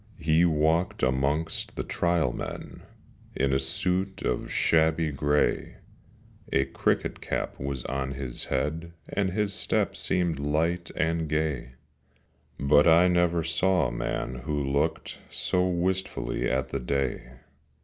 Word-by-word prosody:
He 80 +1 +3
walked 80 +4 +1
amongst 70 +5 0
the - - -2
Trial 85 -7 +1
Men - - -7 0.5
In 70 +1 +1
a 65 - +3
suit 90 +8 -1
of - - -1
shabby 80 -1 +2
grey; 75 +1 +1 0.8
A 70 - +3
cricket - - -1
cap - - -3
was 70 -2 -4
on 65 +1 -2
his 65 -3 -5
head, 80 +5 -2 0.2
And 100 -2 0
his 100 +2 -1
step - - 0
seemed 85 -5 0
light 80 +4 0
and 80 -1 0
gay; 75 -5 -1 0.9
But 75 +2 +5
I 85 +2 +6
never 85 -1 +2
saw 85 -1 +2
a - - -8
man 65 - -3
who 75 +3 -2
looked 70 +4 -1
So 90 0 0
wistfully 90 -8 -1
at 65 0 0
the - - -2
day. 65 0 -2
80 Hz, 130 wpm, -27 LUFS, 70-85 Hz, 0.9 s, I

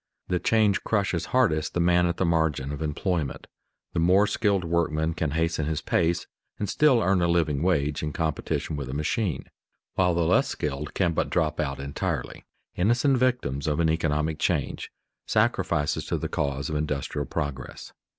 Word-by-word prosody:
The 90 -1 +1
change 105 +1 +2
crushes 95 -6 0
hardest 80 -12 +1
the - - +1
man 90 0 +4
at 85 - -2
the 95 - +1
margin 80 -5 +1
of 75 +1 -5
employment. 80 0 -2 0.5
The - - 0
more 90 +5 +5
skilled 100 -3 +1
workman 80 -1 0
can 80 -1 -1
hasten 80 0 0
his 80 -1 -1
pace 85 +1 +1 0.3
and 105 - -2
still 130 -1 +4
earn 95 0 +2
a 85 - +3
living 80 -4 +1
wage 75 -5 +1
in 75 - -2
competition 80 0 -2
with 70 -3 -5
a 65 - -4
machine, 80 - -1 0.5
while 90 -2 +2
the 85 -1 +1
less - - +3
skilled 75 0 -4
can 85 -3 +2
but - - 0
drop 75 -1 0
out 70 -2 -2
entirely, 70 +1 -4 0.3
innocent 120 +8 +3
victims 100 - 0
of 75 0 0
an 80 -1 +3
economic 80 -1 0
change, - - -1 0.4
sacrifices 75 0 +1
to - - 0
the - - -3
cause 70 -1 -2
of 75 - -3
industrial 75 -2 -2
progress. 70 -2 -5
80 Hz, 170 wpm, -26 LUFS, 75-90 Hz, 0.5 s, more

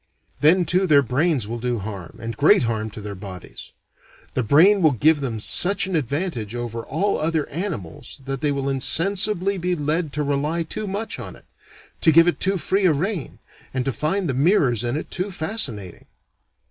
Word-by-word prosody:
Then 175 +4 +4
too 185 +4 +2
their 145 -3 +5
brains 135 -1 0
will 120 +2 -5
do 120 0 -1
harm, 100 -5 -7
and 115 0 -5
great 155 +6 +4
harm, 110 -2 -2
to 105 - -9
their 105 0 -6
bodies. 95 -2 -10 0.6
The - - 0
brain 170 - +5
will 155 -4 +4
give 150 +5 +3
them 120 -5 -3
such 190 - +1
an 190 -1 -3
advantage 140 - -2
over 115 -1 -5
all 190 - -1
other 160 -1 -1
animals 145 - -5
that 135 -1 -4
they 150 - +1
will 140 -1 -2
insensibly 185 - +2
be 180 +1 -1
led 155 +1 -1
to 150 - -1
rely 145 +4 -1
too 210 +6 -4
much 205 +3 -4
on - - -8
it, - - -20 0.6
to 160 - +5
give 165 +2 +6
it 175 - +1
too 195 +1 +1
free 190 +4 +1
a 165 - +4
rein, 170 +1 -3 0.4
and 130 -1 -1
to 135 - 0
find 170 +8 -1
the 135 - -1
mirrors 135 - +2
in 120 +4 -1
it - - -7
too 185 +2 -2
fascinating. 155 - -4
150 Hz, 190 wpm, -22 LUFS, 120-180 Hz, 0.6 s, give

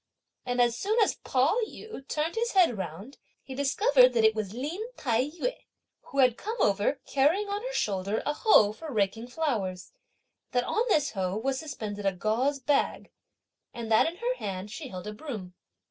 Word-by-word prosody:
and 245 0 -1
as 240 -1 +4
soon 410 - -1
as - - 0
Pao 275 - +2
yü 435 -14 -10
turned 310 +2 -1
his 465 +1 -1
head 355 - +5
round, 195 - -7 0.2
he 265 - -8
discovered 270 -1 +4
that 230 -2 +2
it 220 0 +6
was 215 -3 -3
Lin 290 - -4 0.2
Tai 240 -1 +1
yü, 345 - -3 0.5
who 275 - -9
had 255 -3 +4
come 445 +3 -4
over 205 +7 +2
carrying 315 +10 +2
on 405 +1 -2
her - - -4
shoulder 200 - -1
a 295 - +1
hoe 295 - +5
for 315 +6 -8
raking 220 +1 0
flowers, 230 - -2 0.6
that 245 -1 +2
on 435 - 0
this 295 -7 +2
hoe 190 -1 -2
was 265 +4 -1
suspended 210 -10 -4
a 195 - +2
gauze 225 +10 0
bag, 275 +1 0 0.6
and 230 -1 -5
that 220 - +5
in 330 - -3
her 475 +6 -1
hand 195 +1 -5
she 290 +4 -6
held 185 -6 -8
a 210 - -5
broom. 210 -7 -7
255 Hz, 185 wpm, -28 LUFS, 210-310 Hz, 0.6 s, it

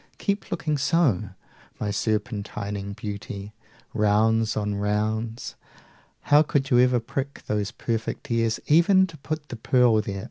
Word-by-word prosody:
keep 200 0 -2
looking 150 -2 -1
so 155 +5 +1 0.8
25 - - -33
My 105 - -1
serpentining 105 -1 -3
beauty, 100 0 -6 0.4
rounds 110 +2 +2
on 105 -1 -1
rounds! 110 +3 -2 0.7
How 145 +1 +5
could 140 -3 0
you 120 - +6
ever 125 0 +4
prick 135 +4 -5
those 105 -1 -1
perfect 115 -1 -4
ears, 115 -1 +1
Even 180 +5 +5
to 165 -4 -11
put 155 +1 -5
the 120 - -6
pearl 120 -2 +3
there! 100 -2 -5
110 Hz, 140 wpm, -25 LUFS, 105-135 Hz, 0.8 s, you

